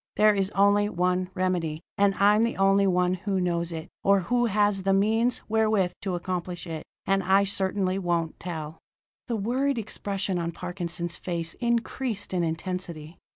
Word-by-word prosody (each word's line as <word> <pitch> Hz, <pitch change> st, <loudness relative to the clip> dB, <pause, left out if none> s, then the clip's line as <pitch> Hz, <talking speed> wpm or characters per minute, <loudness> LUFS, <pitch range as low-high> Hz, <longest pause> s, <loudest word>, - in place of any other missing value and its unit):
There 215 Hz, 0 st, +5 dB
is 195 Hz, -1 st, 0 dB
only 205 Hz, +1 st, +4 dB
one 180 Hz, 0 st, 0 dB
remedy; 175 Hz, -4 st, -1 dB
and 200 Hz, -1 st, +3 dB
I'm 205 Hz, +2 st, +4 dB
the 230 Hz, +1 st, 0 dB
only 195 Hz, +1 st, +4 dB
one 180 Hz, -1 st, +2 dB
who 190 Hz, +1 st, -1 dB
knows 170 Hz, -1 st, -1 dB
it, 160 Hz, 0 st, -5 dB, 0.2 s
or 200 Hz, 0 st, +4 dB
who 240 Hz, +6 st, +1 dB
has 205 Hz, -2 st, +2 dB
the 195 Hz, 0 st, +2 dB
means 225 Hz, +5 st, +2 dB
wherewith 215 Hz, -4 st, +2 dB
to 190 Hz, -3 st, -2 dB
accomplish 180 Hz, 0 st, -4 dB
it. 160 Hz, -2 st, -5 dB, 0.2 s
And 195 Hz, 0 st, +2 dB
I 190 Hz, +2 st, +4 dB
certainly 190 Hz, -1 st, -1 dB
won't 170 Hz, -3 st, -1 dB
tell!" 160 Hz, -3 st, -6 dB, 0.5 s
The 235 Hz, -, -1 dB
worried 250 Hz, +6 st, 0 dB
expression 200 Hz, -3 st, -2 dB
on 170 Hz, 0 st, -3 dB
Parkinson's 175 Hz, -1 st, -4 dB
face 170 Hz, -2 st, -3 dB
increased 235 Hz, -3 st, -1 dB
in 180 Hz, -2 st, +1 dB
intensity. 165 Hz, -1 st, -4 dB
190 Hz, 160 wpm, -26 LUFS, 175-205 Hz, 0.5 s, There